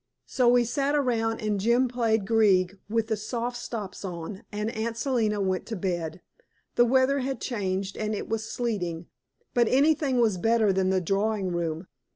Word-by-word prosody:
So 250 -2 +1
we 245 0 +5
sat 275 +4 0
around 230 -5 0
and 210 -2 0
Jim 235 +5 +3
played 225 -4 0
Grieg 195 -4 +3
with 225 0 +1
the 220 0 -1
soft 235 +3 -3
stops 220 -6 -6
on, 180 +1 -6
and 210 +2 -2
Aunt 230 +1 -3
Selina 230 -5 0
went 190 -2 -1
to 225 - -4
bed. 175 -3 -3 0.5
The 240 - +5
weather 260 +3 +3
had 265 -2 -3
changed, 195 -4 -2
and 215 0 -2
it - - -5
was 225 0 -2
sleeting, 180 -9 -2 0.5
but 240 -2 +3
anything 280 0 +3
was 215 -6 +2
better 225 0 +3
than 190 0 +1
the 190 -1 +2
drawing 195 +1 0
room. 170 0 -2
220 Hz, 175 wpm, -27 LUFS, 190-240 Hz, 0.5 s, we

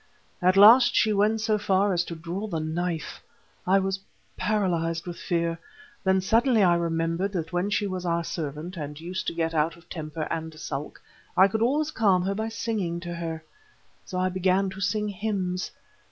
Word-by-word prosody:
At 185 +2 +4
last 235 +5 +8
she 215 -1 +4
went 210 +2 +2
so 215 -1 +1
far 200 -1 +2
as 175 -1 +1
to 170 - -6
draw 170 +6 -5
the 165 -6 -2
knife. 165 +1 -3 0.5
I 190 +2 +5
was 195 0 0 0.4
paralyzed 175 -5 0
with 175 -1 -6
fear, 170 -1 -1 0.4
then 190 0 +3
suddenly 225 +3 +3
I 175 -2 +5
remembered 170 +3 0
that 170 -1 -3
when 180 +3 0
she 205 0 0
was 185 -2 -3
our 170 -1 0
servant, 160 +2 -5
and 150 -1 -6
used 180 +3 -5
to - - -2
get 165 0 -1
out 160 +1 +1
of 170 - -20
temper 155 -2 -4
and 160 -1 -4
sulk, 145 -1 -5 0.4
I 190 - +8
could 220 +3 -2
always 295 +6 +1
calm 195 -7 +3
her 195 +2 0
by 220 +2 -2
singing 205 -6 -2
to 175 -1 -5
her. 165 -2 -5 0.6
So 185 - -6
I 185 0 +1
began 185 +1 +1
to 190 +1 -8
sing 210 +2 0
hymns. 190 -3 -2
185 Hz, 185 wpm, -26 LUFS, 165-200 Hz, 0.6 s, last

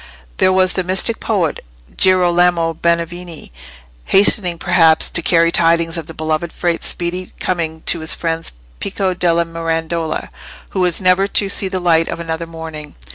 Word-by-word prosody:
There 185 - +3
was 185 0 +2
the 185 - -1
mystic 190 +5 0
poet 190 -8 -1 0.3
Girolamo 175 -2 +3
Benevieni 170 - -3 0.5
hastening, 190 -3 +3
perhaps, 165 -2 +4
to 170 - -1
carry 170 0 +3
tidings 165 0 +2
of 165 -3 -5
the 165 - -10
beloved 160 +1 -2
Frate's 175 -2 -2
speedy 180 +1 -4
coming 160 -3 -2
to 170 - +1
his 160 +1 0
friend 165 -1 -2 0.3
Pico 190 - -2
della 170 -1 +1
Mirandola, 165 0 -3 0.4
who 190 - -4
was 180 0 +2
never 185 +1 +3
to 200 0 +1
see 195 0 -1
the 190 0 -3
light 165 -2 +2
of 170 - -4
another 165 0 -4
morning. 160 -2 -9
170 Hz, 155 wpm, -17 LUFS, 165-185 Hz, 0.5 s, perhaps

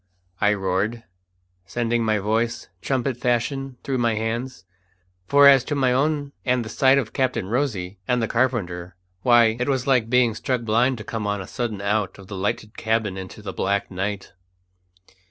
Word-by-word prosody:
I 105 +1 +3
roared, 100 +4 -1 0.6
sending 120 +3 0
my 110 -1 +2
voice, 110 +3 -1
trumpet 130 -2 -1
fashion, 125 +2 -1
through 135 -2 -1
my 115 -2 +2
hands; 115 0 -3 0.6
for 140 0 +7
as 135 -2 +7
to 145 - -2
my 130 -3 +2
own 145 +1 0
and 125 -2 +1
the - - -7
sight 135 +3 +4
of 125 -5 -2
Captain 130 -7 0
Rosy 100 -5 -2
and 125 -1 +2
the 115 - 0
carpenter, 95 -8 -1 0.3
why, 115 0 +5
it 125 - -1
was 130 -2 0
like 125 -5 +2
being 125 -2 +3
struck 125 +2 -2
blind 120 +4 +2
to 105 - -7
come 110 -2 -4
on 100 0 -1
a 95 - -6
sudden 115 -4 -4
out 105 0 0
of 100 - -12
the 100 - -6
lighted 105 +3 -3
cabin 110 -3 0
into 95 +2 -8
the 95 -2 -5
black 100 0 -1
night. 95 +1 -4
115 Hz, 175 wpm, -23 LUFS, 105-130 Hz, 0.6 s, for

